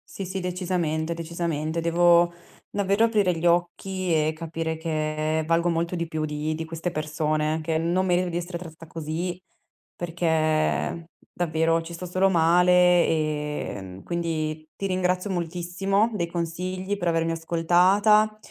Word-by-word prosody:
Sì, 195 Hz, -, -4 dB
sì, 190 Hz, +1 st, -4 dB
decisamente, 175 Hz, -3 st, -1 dB
decisamente. 165 Hz, -1 st, -3 dB
Devo 175 Hz, +1 st, +4 dB, 0.4 s
davvero 200 Hz, +2 st, +1 dB
aprire 205 Hz, -6 st, +2 dB
gli 165 Hz, -, -3 dB
occhi 175 Hz, +2 st, 0 dB
e 155 Hz, -1 st, +2 dB
capire 160 Hz, 0 st, -3 dB
che 155 Hz, -1 st, -1 dB
valgo 170 Hz, +2 st, +2 dB
molto 170 Hz, +1 st, -1 dB
di 170 Hz, -1 st, -2 dB
più 155 Hz, -1 st, -2 dB
di 150 Hz, +1 st, -2 dB
di 160 Hz, +1 st, -4 dB
queste 165 Hz, +2 st, -4 dB
persone 155 Hz, 0 st, -1 dB
che 160 Hz, 0 st, -1 dB
non 175 Hz, +3 st, +1 dB
merito 180 Hz, 0 st, +2 dB
di 170 Hz, -, -2 dB
essere 175 Hz, 0 st, -4 dB
trattata 165 Hz, -1 st, -11 dB
così, 165 Hz, +3 st, -4 dB, 0.6 s
perché 165 Hz, -1 st, 0 dB, 0.2 s
davvero 165 Hz, -1 st, +1 dB
ci 170 Hz, +1 st, -9 dB
sto 180 Hz, +2 st, -6 dB
solo 185 Hz, +2 st, +2 dB
male, 175 Hz, +1 st, +4 dB, 0.4 s
ehm, 150 Hz, -, -3 dB
quindi 155 Hz, -2 st, -3 dB
ti 195 Hz, -, -3 dB
ringrazio 185 Hz, +1 st, 0 dB
moltissimo 180 Hz, +4 st, 0 dB
dei 175 Hz, -4 st, 0 dB
consigli, 180 Hz, +3 st, -3 dB
per 175 Hz, -3 st, 0 dB
avermi 165 Hz, 0 st, +1 dB
ascoltata. 180 Hz, +6 st, +3 dB
170 Hz, 140 wpm, -25 LUFS, 160-180 Hz, 0.6 s, Devo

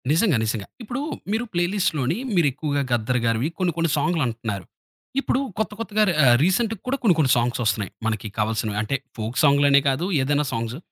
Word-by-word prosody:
నిజంగా. 165 Hz, -, +3 dB
నిజంగా. 110 Hz, -2 st, -2 dB, 0.2 s
ఇప్పుడు 245 Hz, +5 st, -4 dB, 0.3 s
మీరు 220 Hz, +3 st, 0 dB
ప్లే 175 Hz, 0 st, +2 dB
లిస్ట్‌లోని 160 Hz, -6 st, 0 dB, 0.2 s
మీరు 170 Hz, -4 st, +4 dB
ఎక్కువగా 145 Hz, +1 st, -2 dB
'గద్దర్' 120 Hz, +1 st, +1 dB
గారివి 115 Hz, +5 st, +1 dB
కొన్ని 180 Hz, -2 st, +1 dB
కొన్ని 165 Hz, 0 st, +1 dB
సాంగ్లు 160 Hz, +3 st, +1 dB
అంటన్నారు. 110 Hz, -5 st, -4 dB, 0.5 s
ఇప్పుడు 265 Hz, -, 0 dB, 0.2 s
కొత్త 220 Hz, -, 0 dB
కొత్తగా 215 Hz, -1 st, +1 dB
రా -, -, +1 dB
ఆహ్, 120 Hz, -1 st, +7 dB
రీసెంట్‌గా 210 Hz, +4 st, +1 dB
కూడా 270 Hz, +2 st, 0 dB
కొన్ని 190 Hz, -7 st, +5 dB
కొన్ని 135 Hz, -4 st, +3 dB
సాంగ్స్ 120 Hz, +1 st, 0 dB
వస్తున్నాయి. 100 Hz, -3 st, 0 dB
మనకి 110 Hz, -1 st, -2 dB
కావాల్సినవి 110 Hz, -1 st, -1 dB
అంటే, 125 Hz, +6 st, -1 dB, 0.2 s
ఫోక్ 110 Hz, +3 st, -4 dB
సాంగ్లనే 140 Hz, -1 st, +5 dB
కాదు 135 Hz, +6 st, -1 dB, 0.2 s
ఏదైనా 145 Hz, +2 st, +1 dB
సాంగ్స్. 115 Hz, +2 st, -3 dB
140 Hz, 180 wpm, -23 LUFS, 115-175 Hz, 0.5 s, ఆహ్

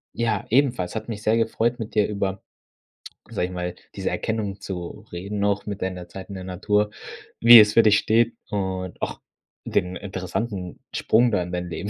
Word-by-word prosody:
Ja, 115 Hz, -1 st, 0 dB
ebenfalls, 120 Hz, -8 st, +2 dB
hat 110 Hz, -, -4 dB
mich 105 Hz, -2 st, -5 dB
sehr 110 Hz, +1 st, +3 dB
gefreut 115 Hz, +2 st, 0 dB
mit 110 Hz, -2 st, -6 dB
dir 105 Hz, -, +4 dB
über- 100 Hz, -2 st, -2 dB, 0.9 s
sage 90 Hz, -, -1 dB
ich 90 Hz, -, -9 dB
mal- 90 Hz, 0 st, -4 dB, 0.2 s
diese -, -, -2 dB
Erkenntnis 105 Hz, -3 st, -2 dB
zu 95 Hz, +2 st, -7 dB
reden 100 Hz, +4 st, -5 dB
noch 100 Hz, 0 st, +1 dB
mit 100 Hz, -1 st, -5 dB
deiner 90 Hz, -2 st, -4 dB
Zeit 95 Hz, +2 st, -10 dB
in 100 Hz, -, -6 dB
der 95 Hz, -, -6 dB
Natur, 105 Hz, +3 st, 0 dB, 0.5 s
wie 115 Hz, 0 st, +11 dB
es 105 Hz, 0 st, +6 dB
für 115 Hz, -, +6 dB
dich 105 Hz, -1 st, +5 dB
steht 115 Hz, +1 st, +2 dB
und 95 Hz, -3 st, -3 dB
auch -, -, -4 dB, 0.4 s
den 90 Hz, 0 st, 0 dB
interessanten 95 Hz, 0 st, -4 dB, 0.2 s
Sprung 120 Hz, +2 st, +3 dB
da 90 Hz, -4 st, +1 dB
in 90 Hz, -, -7 dB
dein 90 Hz, 0 st, -3 dB
Leben 85 Hz, +5 st, -4 dB
100 Hz, 185 wpm, -24 LUFS, 90-110 Hz, 0.9 s, wie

